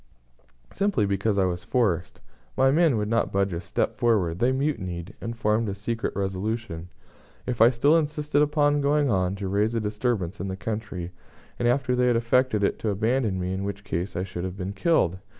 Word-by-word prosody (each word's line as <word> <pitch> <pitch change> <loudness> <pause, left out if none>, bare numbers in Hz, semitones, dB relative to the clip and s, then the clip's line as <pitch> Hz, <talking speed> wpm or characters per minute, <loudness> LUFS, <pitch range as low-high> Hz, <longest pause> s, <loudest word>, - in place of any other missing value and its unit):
"Simply 195 - +1
because 100 +1 0
I 95 - +3
was 90 -1 -2
forced. 105 -5 0 0.4
My 135 0 +5
men 155 -4 +3
would 105 -1 -1
not 115 0 +1
budge 100 -1 +1
a 85 - -3
step - - -2
forward. 95 -8 +2
They 125 +2 +3
mutinied, 95 - -2
and 115 0 -5
formed 110 0 +1
a 100 - -3
secret 115 +3 -3
resolution 95 -2 -3 0.6
if 120 -3 -2
I 115 - +9
still 135 +6 +3
insisted 150 -2 +1
upon 145 -1 +2
going 145 -1 +2
on 95 -1 +1
to 100 -1 -4
raise 105 +4 +1
a - - +2
disturbance 105 -3 -2
in 95 - -3
the 95 0 -4
country, 100 -5 -4 0.5
and 120 - +1
after 125 +1 +2
they 125 0 +2
had 120 - +3
effected 115 -2 +2
it - - +1
to 110 - -1
abandon 110 0 0
me; 90 +1 -2
in 95 +1 -3
which 100 0 -5
case 90 +1 -3
I 90 - -1
should 90 -2 -5
have 95 +1 -5
been 95 +1 -4
killed. 100 - +1
105 Hz, 200 wpm, -25 LUFS, 95-125 Hz, 0.6 s, I